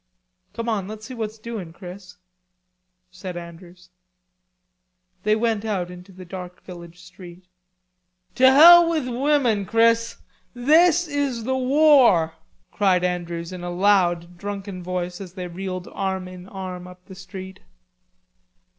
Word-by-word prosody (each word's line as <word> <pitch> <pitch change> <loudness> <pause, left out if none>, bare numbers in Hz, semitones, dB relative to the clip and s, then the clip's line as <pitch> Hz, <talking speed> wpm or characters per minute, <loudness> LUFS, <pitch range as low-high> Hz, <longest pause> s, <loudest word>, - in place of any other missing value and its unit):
"Come 230 0 -5
on, 205 -5 -1
let's 215 +1 -9
see 260 - -8
what's 220 -2 -5
doing, 215 -7 -7
Chris," 180 0 -11 0.9
said 180 0 -8
Andrews. 175 +1 -12 1.3
They 215 +2 +2
went 220 -1 -1
out 190 -5 -3
into 180 +2 -12
the 185 0 -12
dark 180 0 -9
village 175 -1 -11
street. 180 0 -14 0.9
"To 260 +1 +5
hell 340 +4 +9
with 310 -6 -1
women, 250 -4 +1
Chris, 230 0 +2 0.4
this 330 +7 +4
is 285 -5 -2
the 260 +3 -1
war!" 260 - +4 0.4
cried 185 -3 +2
Andrews 175 -1 -3
in 180 -1 -8
a 175 - -4
loud 175 -2 +1
drunken 200 -1 -6
voice 180 0 -4
as 180 -3 -9
they 180 -2 -6
reeled 185 +1 -6
arm 190 -1 -3
in 185 +1 -11
arm 185 -2 -7
up 180 0 -15
the 190 - -12
street. 190 0 -10
190 Hz, 135 wpm, -23 LUFS, 180-230 Hz, 1.3 s, hell